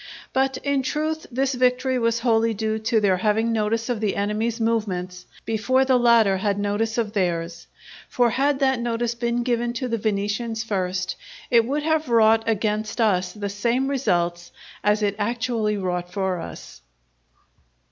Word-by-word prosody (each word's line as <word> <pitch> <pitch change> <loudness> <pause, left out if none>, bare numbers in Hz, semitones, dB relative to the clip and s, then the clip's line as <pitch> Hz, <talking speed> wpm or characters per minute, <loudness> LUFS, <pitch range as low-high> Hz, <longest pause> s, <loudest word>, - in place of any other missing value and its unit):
But 265 0 +1
in 280 -1 +1
truth 310 +4 -2
this 265 +2 0
victory 255 +1 +1
was 230 0 +1
wholly 225 -2 +2
due 220 +1 -1
to 220 +1 +1
their 195 -3 +2
having 220 +4 +1
notice 225 +1 0
of 245 -3 -1
the 210 -2 0
enemy's 215 +3 -1
movements 185 -6 -2 0.2
before 255 +4 +1
the 260 -1 +3
latter 230 -5 +4
had 200 +1 0
notice 205 +2 -1
of 220 -3 -1
theirs. 170 -4 -2 0.4
For 240 -2 +2
had 280 +3 +1
that 265 -2 +2
notice 235 0 -1
been 235 0 -1
given 240 -1 0
to 250 +2 -3
the 230 -2 -2
Venetians 215 +2 -2
first, 185 -3 -2 0.3
it 230 -2 +5
would 290 +4 -2
have 315 -3 0
wrought 225 -1 +4
against 215 +1 -1
us 185 -5 +2
the 205 -1 -4
same 235 +6 0
results 175 -10 -1 0.3
as 210 +1 +2
it 205 -1 +1
actually 230 -1 -1
wrought 180 -2 -3
for 190 -2 -1
us. 115 - -9
225 Hz, 160 wpm, -23 LUFS, 205-245 Hz, 0.4 s, it